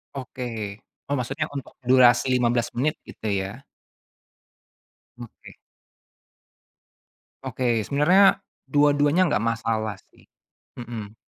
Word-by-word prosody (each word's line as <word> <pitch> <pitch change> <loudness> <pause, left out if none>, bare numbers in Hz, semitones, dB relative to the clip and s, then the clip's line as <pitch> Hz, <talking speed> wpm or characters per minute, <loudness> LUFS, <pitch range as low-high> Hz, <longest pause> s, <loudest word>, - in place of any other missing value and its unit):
Oke. 115 -6 -6 0.3
Oh, 145 - -1
maksudnya 135 +5 -3
untuk 140 - -6 0.2
durasi 125 -1 +5
15 120 -1 +1
menit 150 +5 0
gitu 110 - -8
ya? 100 +7 -4 1.6
Oke. 120 -2 -12 1.9
Oke, 120 -4 -1
sebenarnya 185 +7 +4 0.2
dua-duanya 145 +4 +3
enggak 110 - 0
masalah 110 -2 -2
sih. - - -24 0.5
Mmm. 115 -4 -7
125 Hz, 90 wpm, -24 LUFS, 115-145 Hz, 1.9 s, durasi